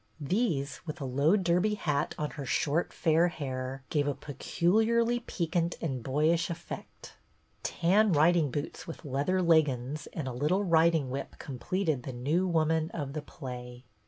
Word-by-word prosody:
These, 145 - -1
with 155 +2 -5
a 140 - -4
low 140 +8 +3
derby 185 +3 +2
hat 150 -7 -1
on 150 -1 -2
her 145 - -6
short 145 +5 0
fair 165 +1 +3
hair, 130 -4 -4
gave 145 -2 +1
a 145 - 0
peculiarly 220 - +1
piquant 170 -6 -1
and 135 -7 -3
boyish 155 +8 +1
effect. 170 - -8 0.5
Tan 200 +5 +3
riding 160 0 +4
boots 145 +4 -5
with 165 0 -8
leather 145 +7 0
leggins 150 -3 +2
and 150 -4 -4
a 130 - -3
little 150 +11 +1
riding 165 -6 +3
whip 135 +1 -5
completed 150 +3 -2
The 130 +1 -6
New 150 +10 0
Woman 160 -1 +1
of 140 -4 -4
the 155 - -3
play. 125 -4 -8
155 Hz, 155 wpm, -30 LUFS, 140-175 Hz, 0.5 s, riding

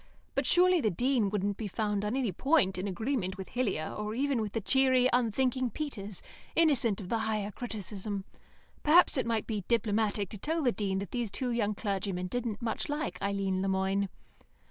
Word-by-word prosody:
But - - 0
surely 360 -1 +5
the 220 - +2
Dean 240 +2 +1
wouldn't 200 0 -1
be 220 - -3
found 205 0 -1
on 210 +4 -1
any 255 -6 0
point 195 - +2
in 190 - -2
agreement 200 -1 -2
with 190 - -7
Hillier, 205 -11 -1
or 210 +1 -3
even 270 -2 +1
with 210 -2 -4
the 225 - 0
cheery, 260 +3 +4
unthinking 250 +1 +1
Peters, 210 - -5 0.3
innocent 270 -11 +3
of 185 -3 -7
the 230 - +1
Higher 215 -2 -1
Criticism. 205 -3 -5 0.6
Perhaps 335 +4 +6
it 260 - 0
might 225 -2 0
be 210 -4 -3
diplomatic 215 -3 +1
to 210 - -8
tell 320 - -1
the 250 - +4
Dean 195 -4 -1
that 195 +1 -4
these 240 -3 -1
two 250 +4 -1
young 215 -3 0
clergymen 195 -3 -2
didn't 235 +2 -3
much 230 +6 -2
like 295 +1 -3
Eileen 195 -1 0
Le 195 - 0
Moine. 190 +1 +1
215 Hz, 190 wpm, -30 LUFS, 200-250 Hz, 0.6 s, Perhaps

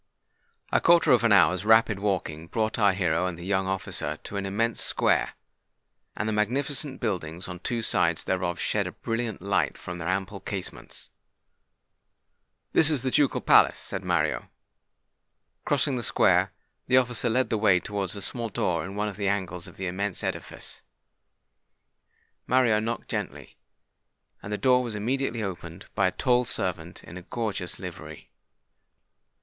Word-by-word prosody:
A - - +3
quarter 170 0 +5
of 120 -2 +5
an 115 - +4
hour's 90 -1 +5
rapid 110 -1 +4
walking 85 -6 -2
brought 110 +4 -1
our 100 -2 +5
hero 90 -2 +1
and 90 -2 -4
the 85 - -8
young 95 -1 0
officer 95 0 -3
to - - -8
an 100 0 -2
immense 115 +4 -1
square; - - +1 0.8
and 110 - -1
the 110 - 0
magnificent 135 +6 -1
buildings 90 -6 -3
on 90 -1 -7
two 115 +4 -2
sides 85 -5 +2
thereof 90 -2 -1
shed - - 0
a - - -5
brilliant 115 -4 -3
light 85 -8 +1
from 90 0 -7
their 85 - -4
ample 95 +2 -2
casements. 95 -2 -6 1.6
"This 160 - +6
is 145 -5 0
the 130 - 0
ducal 145 -1 +2
palace," - - +5
said 95 - -6
Mario. 85 -4 0 1.2
Crossing 140 -2 +1
the - - -2
square, - - +3 0.4
the 125 - +5
officer 125 -2 +2
led 130 +3 +1
the 110 - +2
way 100 -4 +5
towards 100 0 -4
a 100 - -6
small 115 +2 -4
door 85 -5 -1
in 95 +3 -7
one 105 +1 -1
of 100 -2 -6
the 100 -1 -1
angles 95 -3 -2
of - - -14
the 95 - -4
immense 95 +2 -2
edifice. - - -5 1.7
Mario 120 -4 +4
knocked 115 +2 -3
gently; - - -5 0.9
and 100 - -7
the 105 - -1
door 125 +1 +4
was 120 -4 -4
immediately 120 +1 -1
opened 85 -2 -6
by 100 -3 +3
a - - 0
tall 125 +4 +2
servant 90 -7 -2
in 85 - -10
a - - -7
gorgeous 100 -2 -3
livery. - - -9
100 Hz, 160 wpm, -27 LUFS, 90-115 Hz, 1.7 s, This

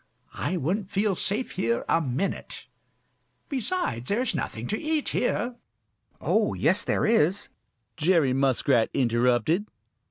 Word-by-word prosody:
I 185 - -2
wouldn't 185 +6 -1
feel 200 0 +1
safe 210 +7 -1
here 115 +1 -1
a 165 - +3
minute. 140 +6 -3 0.8
Besides, 260 - -2
there 210 +5 +1
is 255 - 0
nothing 115 +1 -4
to 215 - -2
eat 310 -1 0
here." 245 0 -1 0.6
"Oh, 210 +7 +1
yes, 170 +7 +2
there - - 0
is," 205 -3 +2 0.5
Jerry 160 -5 +3
Muskrat 130 -3 +2
interrupted. 125 - +2
180 Hz, 125 wpm, -26 LUFS, 130-215 Hz, 0.8 s, a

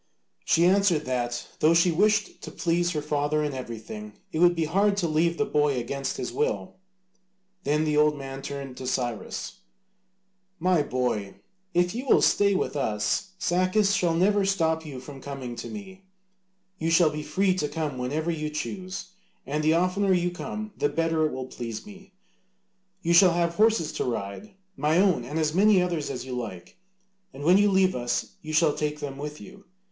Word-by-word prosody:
She 170 - +4
answered 185 -4 +3
that 120 -2 -2
though 160 +2 +4
she 170 +1 +4
wished 210 +6 +1
to - - -7
please 175 0 0
her 150 -2 -2
father 150 0 0
in 145 -1 -2
everything, 110 -4 -7 0.2
it 160 - -2
would 175 0 +5
be 165 -1 0
hard 200 +5 +2
to 175 - +1
leave 165 +2 +1
the 215 - +1
boy 150 -8 +1
against 135 +3 -3
his - - -4
will. 450 +3 -2 0.9
Then 150 +1 +2
the 150 -1 +1
old 150 0 +4
man 135 -1 -7
turned 140 -2 -6
to 130 - -6
Cyrus: 120 -4 -3 1.0
"My 180 -1 +2
boy, 125 -8 -2 0.4
if 175 0 +2
you 250 +4 -5
will - - +5
stay 200 -1 +4
with 185 - -1
us, 110 - -1
Sacas 185 +4 +2
shall 175 -4 +1
never 200 +4 +3
stop 160 -5 +1
you 135 -3 -7
from 135 +1 -10
coming 135 -4 -6
to 115 - -6
me: 195 -2 -9 0.7
you 160 - 0
shall 165 -1 +5
be 150 0 -4
free 185 +6 +1
to 150 -5 -2
come 150 -5 -3
whenever 150 +7 -1
you 155 -2 -3
choose, 185 +4 -5 0.3
and 150 +3 -2
the 155 +1 +4
oftener 185 +3 +2
you 175 -1 +1
come 215 +3 -6
the 145 - +1
better 160 +1 +1
it - - -6
will 130 0 -5
please 115 -3 -6
me. 195 -2 -14 0.9
You 170 - +2
shall 180 0 +7
have 170 0 +1
horses 215 -4 +2
to - - -2
ride, 120 - -5 0.2
my 150 +3 +1
own 185 -9 +3
and 145 +6 -5
as 155 -1 +1
many 200 +2 +5
others 175 -5 -1
as 130 -2 -5
you 130 -1 -5
like, 105 - -7 0.6
and 140 - -8
when 180 +5 +5
you 205 0 +4
leave 190 -1 +3
us 120 -1 -2
you 155 - -7
shall 155 -1 +3
take 150 0 -2
them 140 -2 -6
with 150 +1 -6
you. 200 0 -13
160 Hz, 185 wpm, -26 LUFS, 140-185 Hz, 1.0 s, shall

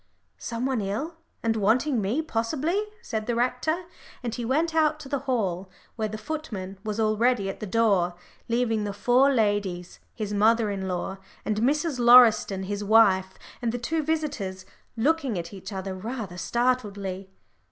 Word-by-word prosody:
"Some 235 +1 -3
one 260 -4 0
ill, 230 +13 -3 0.3
and 225 -1 +1
wanting 230 +5 +2
me, 230 +11 0
possibly," 310 - -1 0.2
said 220 - -3
the 240 - 0
rector, 250 +8 0 0.4
and 235 -2 -3
he 240 - -4
went 310 +7 +1
out 310 -1 +2
to 270 - -10
the 280 -1 0
hall, 190 -6 -1 0.3
where 220 -1 -1
the 215 +1 -6
footman 215 -8 -6
was 215 0 -3
already 215 -1 +2
at - - -13
the 215 - -5
door, 195 -5 +2 0.3
leaving 230 -2 +1
the 205 -1 -3
four 245 +7 +4
ladies 205 -7 -1 0.2
his 210 -2 -4
mother 220 +1 +3
in 190 -1 -3
law, 185 +1 -3 0.3
and 215 -1 0
Mrs. 285 +3 +1
Lauriston, 235 -5 +6
his 205 +2 -3
wife, 195 -3 +4 0.3
and 235 -2 0
the 245 - -2
two 310 +7 -1
visitors 285 -12 -2 0.3
looking 275 - +1
at 170 +1 -5
each 190 0 -8
other 190 -1 -4
rather 210 -1 -5
startledly. 200 -4 -1
225 Hz, 165 wpm, -26 LUFS, 200-255 Hz, 0.4 s, Lauriston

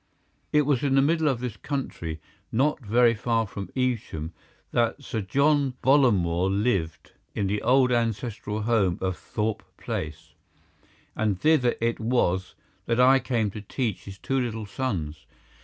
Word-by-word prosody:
It 150 0 +4
was 140 -3 +1
in 140 -2 +1
the 135 - +5
middle 160 +1 +2
of 130 -4 0
this 125 -4 -4
country, 85 - -4 0.3
not 140 +7 +1
very 115 +2 +4
far 115 0 0
from 100 -1 -7
Evesham, 115 - -2 0.4
that 120 +4 0
Sir 110 -4 -3
John 140 +5 +2
Bollamore 95 -10 +3
lived 100 -6 -1 0.2
in 100 - 0
the 100 +2 -1
old 130 0 +4
ancestral 115 -2 -1
home 105 -6 +2
of 95 -1 -1
Thorpe 110 +2 -3 0.2
Place, 75 -1 -5 0.8
and 105 -4 0
thither 150 -6 +3
it 115 0 0
was 110 -6 0 0.3
that 115 +1 +1
I 130 +2 +6
came 115 -6 -1
to 105 - -7
teach 110 0 -3
his 100 -1 -9
two 135 +7 -1
little 115 -3 -3
sons. 85 - -4
115 Hz, 150 wpm, -26 LUFS, 100-130 Hz, 0.8 s, I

